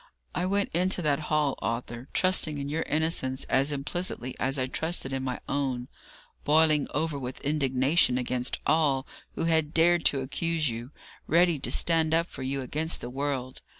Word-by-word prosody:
I 180 - -1
went 200 +1 0
into 180 +1 +1
that 150 -1 +2
hall, 150 -3 +2
Arthur, 120 +2 -4
trusting 185 -5 +2
in 140 0 -4
your 160 +2 -1
innocence 150 -4 0
as 135 +3 +2
implicitly 140 -2 -2
as 135 +1 +1
I 130 - +1
trusted 150 0 -2
in 135 - -1
my 130 -1 -3
own, 130 -3 -2 0.5
boiling 155 -1 +4
over 150 -1 -1
with 125 -1 -6
indignation 135 -1 +2
against 125 0 -2
all 145 -4 +2 0.3
who - - -2
had 160 -2 +1
dared 170 +1 +4
to 135 - +2
accuse 155 +1 -1
you, 115 +2 -6 0.4
ready 170 -2 +3
to - - -3
stand 160 -1 +2
up 165 +1 +2
for - - -10
you 135 +1 -2
against 155 +5 0
the 120 - -7
world. 135 -1 -3
145 Hz, 170 wpm, -28 LUFS, 130-160 Hz, 0.5 s, boiling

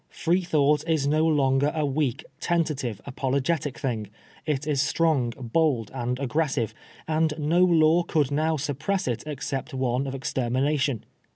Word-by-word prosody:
Freethonght 160 -4 +2
is 155 -4 +2
no 155 +3 +2
longer 140 -1 +2
a 155 -2 +1
weak, 140 -3 -1
tentative, 150 - -1
apologetic 140 +2 -1
thing; 110 -6 -3 0.4
it 145 -2 -1
is 145 -3 +1
strong, 145 -3 +2
bold, 125 -3 0
and 125 -1 -2
aggressive; 140 -4 0 0.3
and 155 -1 +1
no 160 +4 +3
law 165 -1 +5
could 150 -5 0
now 155 +2 +1
suppress 150 +7 -2
it 120 -2 -2
except 145 -1 -4
one 130 +1 0
of 135 - -4
extermination. 135 0 0
145 Hz, 135 wpm, -26 LUFS, 130-155 Hz, 0.4 s, law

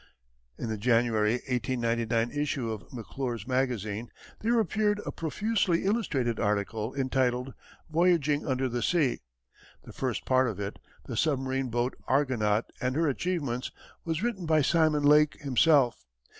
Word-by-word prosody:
In 115 - -4
the 110 -1 -3
January, 115 -1 +2
1899, 115 -2 0
issue 145 -5 -2
of 110 -1 -8
McClure's 120 -2 -5
Magazine 120 -4 -1 0.3
there 230 +2 +2
appeared 210 +1 +1
a - - -3
profusely 190 +1 0
illustrated 140 - 0
article 105 +3 -1
entitled 130 -1 0 0.3
"Voyaging 160 -3 +2
under 130 -1 0
the 120 -1 -2
Sea." 150 -1 +1 0.6
The - - -12
first 130 -4 -3
part 130 0 +3
of 105 -4 -4
it, 100 -1 -5 0.3
"The - - -5
Submarine 135 -3 0
Boat 120 +2 -1
Argonaut 120 -6 +1 0.2
and 125 +1 0
her 165 +1 +2
Achievements," 140 -5 -2 0.3
was 165 +2 -2
written 200 -8 -2
by 155 -2 +4
Simon 155 -1 +3
Lake 150 +1 +5
himself. 140 - +3
130 Hz, 135 wpm, -28 LUFS, 120-155 Hz, 0.6 s, Lake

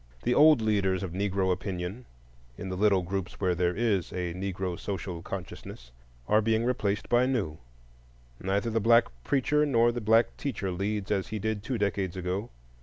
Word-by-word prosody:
The 125 - +2
old 150 -5 +6
leaders 100 -4 +1
of 95 - -4
Negro 95 0 0
opinion, 90 +5 -4 0.5
in 95 - -6
the 95 - -3
little 100 -1 +3
groups 95 +2 -3
where 95 -2 +1
there 90 0 0
is 105 -5 0
a 90 -2 -3
Negro 95 -1 -3
social 95 -4 -4
consciousness, 85 -10 -8 0.4
are 105 +1 +4
being 110 +1 +1
replaced 105 -5 -1
by 120 +1 +3
new; 100 -13 -1 0.8
neither 100 +4 -1
the 115 - +1
black 115 +2 +5
preacher 145 +2 +2
nor 120 -5 +3
the 120 0 -4
black 115 +2 +3
teacher 105 -9 -3
leads 100 +3 -2
as 95 -2 0
he 110 - -4
did 110 0 -2
two 120 +3 -3
decades 100 -3 -1
ago. 95 +5 -3
100 Hz, 175 wpm, -28 LUFS, 95-115 Hz, 0.8 s, old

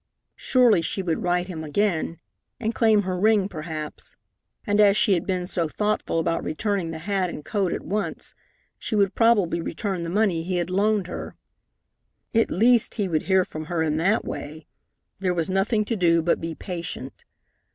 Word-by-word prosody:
Surely 245 -8 +4
she 190 +4 -3
would 170 -3 -1
write 180 0 0
him 165 -4 -6
again, 165 0 0 0.4
and 225 -1 -1
claim 215 -2 +3
her 185 -1 -2
ring 210 -1 +3
perhaps, 155 -3 -7 0.5
and, 205 -2 +3
as 200 0 +5
she 205 - +3
had 170 - -1
been 185 -2 -1
so 170 -2 -1
thoughtful 210 -1 -1
about 165 0 0
returning 190 +2 -1
the 165 - -5
hat 190 +2 -1
and 150 - -8
coat 195 -4 0
at - - -3
once, 210 +2 -3 0.5
she - - -3
would 200 -2 +2
probably 210 -8 +3
return 185 +2 -3
the 170 - -4
money 190 -3 +1
he 180 +2 -2
had 175 +1 -2
loaned 205 +1 +2
her. 180 - -7 1.0
At 225 0 +3
least, 235 +4 +3
he 205 -4 0
would 160 -3 0
hear 190 -1 +4
from 155 0 -7
her 165 0 -1
in 155 -1 0
that 195 +7 +2
way. 155 +1 -7 0.5
There 185 -2 0
was 170 +1 -1
nothing 210 +3 +1
to 230 - -1
do 170 -4 +3
but 170 - +1
be 165 0 -4
patient. 170 -8 -6
185 Hz, 185 wpm, -24 LUFS, 165-210 Hz, 1.0 s, as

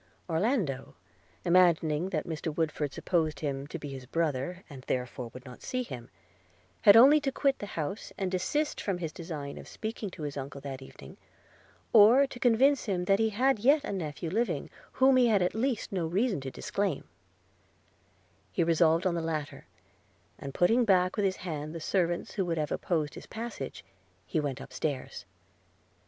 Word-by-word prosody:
Orlando, 170 - -1 0.5
imagining 170 -2 +3
that 155 -5 -2
Mr. 160 -1 -3
Woodford 155 -3 -1
supposed 160 0 -1
him 140 -2 -3
to 170 - -5
be 145 -3 -7
his 130 -2 -8
brother, 165 +4 -1
and 140 -5 -10
therefore 125 -1 -2
would 125 +3 -11
not 125 -1 -11
see 255 0 -2
him, 120 - -8 0.7
had 205 +2 +8
only 280 +6 +8
to 280 -2 -1
quit 275 0 +1
the 205 - -5
house, 160 +7 -4
and 190 -2 -2
desist 290 - -1
from 195 -3 -1
his 165 -3 -4
design 155 -4 -6
of - - -11
speaking 220 -1 -5
to 175 -3 -9
his 145 -1 -4
uncle 140 +1 -6
that 135 -1 -6
evening; 135 - -12 0.8
or 230 +5 +8
to 265 -2 -10
convince 260 +4 +4
him 185 -5 -1
that 195 +2 +3
he 220 0 +3
had 255 +3 +2
yet 280 +7 +4
a - - -4
nephew 160 -2 -4
living, 200 -7 -1 0.2
whom 260 0 +5
he 250 -1 +5
had 205 -5 +3
at 180 - 0
least 240 +1 -1
no 180 -4 -1
reason 195 - 0
to 135 - -5
disclaim: 195 +3 -2 1.5
he - - +1
resolved 165 +1 +3
on 185 - +2
the 170 - -1
latter, 155 -3 -4 0.7
and 135 0 -7
putting 230 +8 +4
back 185 -4 +3
with 205 - +1
his 190 -1 +1
hand 155 -2 -4
the - - -4
servants 175 +1 0
who 195 - 0
would 170 -2 -2
have 150 -2 -1
opposed 155 -4 -1
his - - -10
passage, 225 - -6 0.4
he - - -1
went 140 -3 -2
up 135 -1 -10
stairs. 140 -1 -4
175 Hz, 180 wpm, -29 LUFS, 150-215 Hz, 1.5 s, had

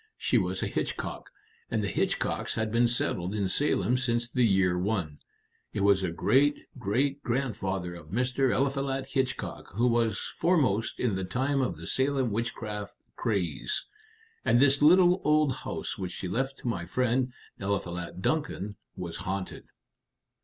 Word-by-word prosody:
She - - +2
was 95 +1 -1
a - - 0
Hitchcock, - - -3 0.4
and 110 -2 0
the - - 0
Hitchcocks - - -1
had 110 -1 -1
been 120 +1 +4
settled 100 -5 -1
in 100 -2 0
Salem 125 0 +2
since 120 -2 +1
the 125 - +2
year 95 -3 +3
1. 90 -6 -1 0.5
It - - -1
was 100 -1 +4
a 90 - +1
great 130 - +3 0.2
great 135 +7 0
grandfather 95 -9 -2
of 85 -3 -11
Mr. 125 +5 +1
Eliphalet 135 0 0
Hitchcock 130 -2 -2
who 115 +4 +2
was 115 -3 +2
foremost 130 - +1
in 120 -4 +1
the 95 - -2
time 135 +8 0
of 130 - -1
the - - -9
Salem 135 -3 +1
witchcraft 105 -2 -4 0.2
craze. 95 -8 -1 0.6
And 120 - +4
this 140 +1 +4
little 180 +4 +6
old 150 -3 +3
house - - -5
which 90 -2 -4
she 95 - -5
left 135 +8 -1
to - - -7
my 90 -7 -2
friend, 125 +4 +1 0.3
Eliphalet 90 -2 -3
Duncan, 145 - -1 0.2
was 85 -2 -5
haunted." 95 0 -4
115 Hz, 155 wpm, -29 LUFS, 95-135 Hz, 0.6 s, little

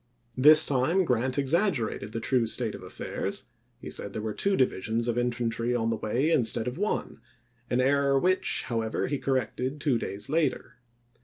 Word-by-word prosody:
This 150 +4 +8
iwd. 130 -3 +1
time 185 +2 +2
Grant 130 0 0
exaggerated 140 - 0
the 115 - -4
true 125 -1 +1
state - - +1
of - - -9
affairs; - - -5 0.3
he - - -9
said - - -3
there 110 - -4
were 110 -1 -3
two 195 - 0
divisions 115 -1 0
of 120 - 0
infantry 120 -1 -1
on 115 -1 0
the - - 0
way, 120 +9 -1
instead 120 -5 +1
of 125 +6 -5
one; 205 - -3 0.5
an 125 - 0
error 140 +1 +2
which, 185 +6 +1
however, 115 -2 -2
he 145 -1 -2
corrected 130 +1 -2
two 140 -5 +1
days 100 -1 -4
later. 150 -3 -1
125 Hz, 175 wpm, -27 LUFS, 115-145 Hz, 0.5 s, This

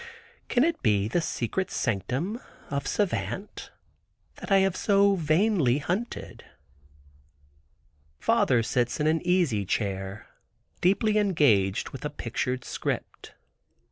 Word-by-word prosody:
Can 245 - +3
it 335 +1 0
be 105 -3 +2
the 170 +10 0
secret 165 +6 -2
sanctum 130 - -2 0.3
of 140 -1 -2
Savant, 205 0 -2 0.7
that - - -8
I 195 - +7
have 195 -2 -1
so 200 -1 +3
vainly 160 - +2
hunted? 180 +11 -4 1.8
Father 115 - +3
sits 120 +3 0
in 150 - +1
an 160 +1 +2
easy 175 - +2
chair 95 0 -3 0.6
deeply 210 +4 +3
engaged 140 - +2
with - - -9
a - - -2
pictured 125 0 -3
script. - - -5
155 Hz, 110 wpm, -27 LUFS, 115-195 Hz, 1.8 s, I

